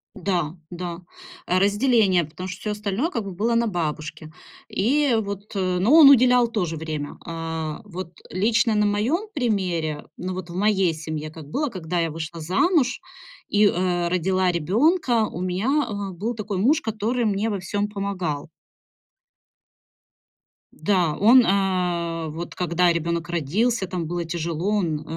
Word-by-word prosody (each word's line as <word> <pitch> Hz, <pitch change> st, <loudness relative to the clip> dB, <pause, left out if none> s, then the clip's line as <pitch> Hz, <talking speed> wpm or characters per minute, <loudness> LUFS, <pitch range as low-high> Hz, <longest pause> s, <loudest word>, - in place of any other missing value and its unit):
Да, 175 Hz, -5 st, -1 dB, 0.2 s
да, 175 Hz, 0 st, -5 dB, 0.5 s
разделение, 200 Hz, 0 st, +3 dB
потому 155 Hz, +5 st, -8 dB
что 185 Hz, -, -7 dB
всё 210 Hz, -, -2 dB
остальное 210 Hz, -, -2 dB
как 230 Hz, -, -2 dB
бы 200 Hz, -, -6 dB
было 220 Hz, +6 st, 0 dB
на 230 Hz, 0 st, +2 dB
бабушке, 155 Hz, -3 st, -4 dB, 0.4 s
и 270 Hz, +5 st, +2 dB
вот, 200 Hz, 0 st, -6 dB
но 185 Hz, +4 st, +1 dB
он 315 Hz, -3 st, +10 dB
уделял 250 Hz, -2 st, +6 dB
тоже 180 Hz, -8 st, -2 dB
время. 155 Hz, -2 st, -5 dB
А, 160 Hz, -1 st, -4 dB
вот 185 Hz, -3 st, -7 dB, 0.2 s
лично 220 Hz, +4 st, +2 dB
на 210 Hz, 0 st, +3 dB
моём 240 Hz, -, 0 dB
примере, 180 Hz, -, -1 dB
ну, 185 Hz, +1 st, -4 dB
вот 180 Hz, -1 st, -6 dB
в 170 Hz, -, -8 dB
моей 195 Hz, -3 st, +2 dB
семье, 155 Hz, -1 st, -5 dB
как 155 Hz, -1 st, -11 dB
было, 295 Hz, -, -1 dB
когда 180 Hz, -4 st, -3 dB
я 165 Hz, -1 st, 0 dB
вышла 160 Hz, +1 st, -6 dB
замуж 255 Hz, -, +1 dB, 0.5 s
и, 210 Hz, +1 st, +4 dB
э, 175 Hz, -1 st, 0 dB
родила 185 Hz, +1 st, +1 dB
ребёнка, 230 Hz, -, +2 dB
у 175 Hz, -, -6 dB
меня, 220 Hz, +11 st, 0 dB
э, 200 Hz, -2 st, -4 dB
был 210 Hz, +7 st, -3 dB
такой 210 Hz, -3 st, -4 dB
муж, 280 Hz, -, +3 dB
который 225 Hz, +2 st, -1 dB
мне 210 Hz, +1 st, 0 dB
во 200 Hz, -, -2 dB
всём 205 Hz, +3 st, -2 dB
помогал. 185 Hz, -7 st, -3 dB, 2.2 s
Да, 170 Hz, -2 st, +1 dB
он, 245 Hz, +5 st, +7 dB
э, 175 Hz, -4 st, 0 dB
вот 165 Hz, +3 st, -6 dB
когда 175 Hz, 0 st, +2 dB
ребёнок 170 Hz, 0 st, -2 dB
родился, 190 Hz, -, 0 dB
там 175 Hz, -2 st, -3 dB
было 175 Hz, +2 st, -3 dB
тяжело, 170 Hz, +2 st, -3 dB
он, 160 Hz, -6 st, -1 dB
185 Hz, 150 wpm, -23 LUFS, 170-215 Hz, 2.2 s, он